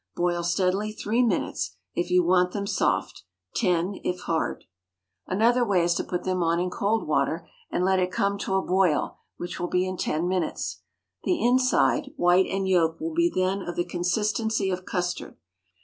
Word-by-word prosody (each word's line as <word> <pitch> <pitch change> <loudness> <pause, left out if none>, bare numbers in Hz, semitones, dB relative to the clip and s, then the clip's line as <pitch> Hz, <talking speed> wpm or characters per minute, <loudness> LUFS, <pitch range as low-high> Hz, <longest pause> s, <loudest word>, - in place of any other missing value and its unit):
Boil 175 0 0
steadily 185 +4 0
three 220 +2 0
minutes, 200 - -1 0.2
if 175 +1 -2
you 180 0 +4
want 180 +1 +3
them 200 -1 -2
soft—ten, 165 - -1
if 180 0 -2
hard. 165 -1 -2 0.6
Another 235 +6 +3
way 195 -6 +2
is 175 0 +2
to - - -1
put 180 -1 -3
them 185 -1 -1
on 170 0 +2
in 180 0 -1
cold 210 +5 0
water, - - 0 0.2
and 180 - 0
let 190 0 +3
it 180 0 0
come 200 +2 0
to 190 - -1
a 190 - +1
boil, 185 -4 +1 0.2
which 175 0 -6
will 175 - -1
be 180 0 +1
in 185 0 -4
ten 165 +1 -1
minutes. 180 -3 -2 0.4
The 355 - +1
inside, 255 +2 +2
white 175 - +4
and 195 0 -1
yolk, 170 -1 +2
will 325 +1 -3
be 340 +1 +3
then 185 +2 0
of 175 -2 -5
the 175 - 0
consistency 210 +3 0
of 185 0 -4
custard. 180 -2 -3
185 Hz, 180 wpm, -26 LUFS, 175-200 Hz, 0.6 s, you